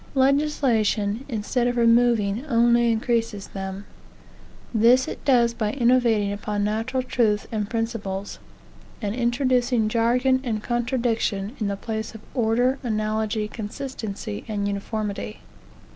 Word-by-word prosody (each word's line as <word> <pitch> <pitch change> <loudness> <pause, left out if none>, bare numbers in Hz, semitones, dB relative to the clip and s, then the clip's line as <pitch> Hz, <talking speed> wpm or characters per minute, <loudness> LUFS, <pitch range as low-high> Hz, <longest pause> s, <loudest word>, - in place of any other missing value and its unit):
Legislation, 260 -6 +2
instead 240 +2 0
of 245 0 -1
removing, 230 -2 +3
only 235 -1 +4
increases 225 -3 -1
them; 195 +1 -6 0.9
This 240 +3 +5
it - - -6
does 240 -4 +4
by 215 -2 -2
innovating 235 -5 +3
upon 205 0 -2
natural 225 +5 -1
truths 220 -5 +1
and 210 -2 -2
principles, 225 -4 -3 0.6
and 205 -3 -2
introducing 245 -1 +1
jargon 250 +3 +2
and 220 -4 -2
contradiction, 235 -3 -1
in 210 - -1
the 200 0 -2
place 220 +1 -5
of 220 - -9
order, 245 +3 +1
analogy, 215 -2 -1
consistency, 210 - -6
and 205 -2 -2
uniformity. 200 - -4
225 Hz, 115 wpm, -24 LUFS, 210-245 Hz, 0.9 s, This